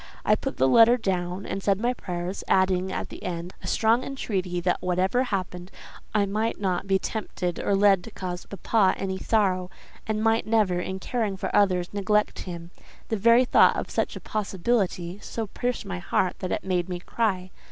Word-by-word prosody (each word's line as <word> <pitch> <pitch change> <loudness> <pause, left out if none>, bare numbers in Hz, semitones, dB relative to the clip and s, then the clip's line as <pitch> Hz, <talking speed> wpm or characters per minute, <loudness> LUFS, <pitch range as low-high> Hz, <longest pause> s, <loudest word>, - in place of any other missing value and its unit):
I - - +5
put - - -5
the 130 - +4
letter 230 - +6
down 185 -3 -2
and 195 - -4
said 195 0 +1
my 240 +3 +1
prayers, 180 -4 -5
adding, 185 0 +2
at - - -4
the - - -10
end, 175 0 -5
a - - -7
strong 230 +3 +2
entreaty 190 -9 -3
that 180 0 0
whatever 185 +6 +1
happened, 185 -4 -4 0.5
I 205 -1 +4
might 215 +3 -1
not 190 -1 -1
be 195 0 +3
tempted 185 -4 -4
or 200 - +1
led 195 -2 +4
to - - -8
cause 180 -4 -6
papa 200 0 +2
any 190 -1 -3
sorrow, 185 -5 +1 0.4
and 215 0 -1
might 225 0 +2
never, 210 -5 +2
in 190 +1 -3
caring 210 -1 -2
for - - -3
others, 185 -3 +2
neglect 210 +1 +1
him. 170 -1 -7 0.4
The 220 - 0
very 235 +5 +5
thought - - +5
of - - -4
such - - -1
a - - -6
possibility, 195 -3 -1
so 225 +1 -4
pierced 245 +3 -3
my 185 -2 -4
heart 180 0 0
that 185 - -4
it - - -1
made 185 -1 -1
me 180 - -2
cry. 185 -2 -1
195 Hz, 190 wpm, -26 LUFS, 180-215 Hz, 0.5 s, letter